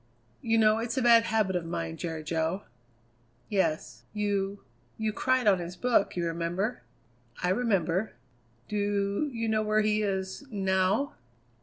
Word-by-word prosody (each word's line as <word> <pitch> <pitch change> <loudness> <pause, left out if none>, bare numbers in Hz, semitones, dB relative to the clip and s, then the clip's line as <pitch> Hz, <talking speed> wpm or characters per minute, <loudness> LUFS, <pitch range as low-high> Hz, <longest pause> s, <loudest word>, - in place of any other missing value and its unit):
"You 225 -1 +2
know, 215 0 +4
it's 235 +2 -3
a - - +2
bad 230 -1 +6
habit 215 -4 +1
of 175 - 0
mine, 85 - -4
Jerry 160 - -5
Jo." 165 +4 -1 0.9
"Yes. 180 -4 -1
You 205 -1 -1 0.3
you 220 -1 -1
cried 255 +2 +1
on 195 -3 +5
his 175 +1 -6
book, 240 +1 +2
you 175 -1 -1
remember?" 170 +7 -2 0.6
"I 180 - +2
remember." 195 -3 +1 0.5
"Do 205 +5 0
you 230 -2 -2
know 220 0 +2
where 215 0 +2
he 215 0 +2
is 190 +3 -2
now?" 195 +4 +1
200 Hz, 145 wpm, -29 LUFS, 180-220 Hz, 0.9 s, bad